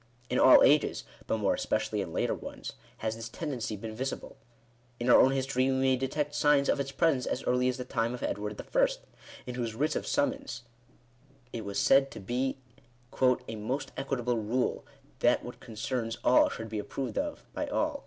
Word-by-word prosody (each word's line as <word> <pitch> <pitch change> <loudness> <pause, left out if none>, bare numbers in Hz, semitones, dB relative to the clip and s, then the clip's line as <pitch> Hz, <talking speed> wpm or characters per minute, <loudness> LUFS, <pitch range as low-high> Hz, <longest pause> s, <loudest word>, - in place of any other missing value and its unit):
In 125 - +2
all 130 - +8
ages, 150 +1 +3 0.2
but - - +1
more 100 -3 +2
especially 110 -1 -1
in 90 -4 -5
later - - 0
ones, - - -7 0.3
has 110 0 0
this 115 0 -7
tendency 125 -6 -4
been 110 +2 -7
visible. 130 +3 -4 0.6
In 120 +1 +2
our - - +8
own 130 - +5
history 135 -1 +1
we 130 - +1
may 130 0 +3
detect 145 +3 -2
signs 145 -1 +3
of - - +2
its 135 0 -2
presence 140 -3 +1
as 130 - -2
early 125 0 +2
as 125 - -2
the 125 - -5
time 120 -1 -1
of 125 - -8
Edward 105 0 -3
I., - - +2 0.6
in 125 - -5
whose 120 -3 -3
writs 150 +6 0
of - - -3
summons 280 - -1 0.9
it 115 - -4
was 100 -1 -4
said 135 0 +5
to - - -9
be 125 +6 -2 0.4
" 120 0 -19 0.3
a 110 - -5
most 115 +7 -3
equitable 125 -3 -1
rule, 115 +4 -1 0.3
that - - +3
what - - -9
concerns 115 +1 -3
all 125 - +5
should 115 0 -6
be 110 -1 -3
approved 130 +5 -3
of 290 0 -4
by - - -3
all." - - -1
125 Hz, 195 wpm, -30 LUFS, 115-135 Hz, 0.9 s, all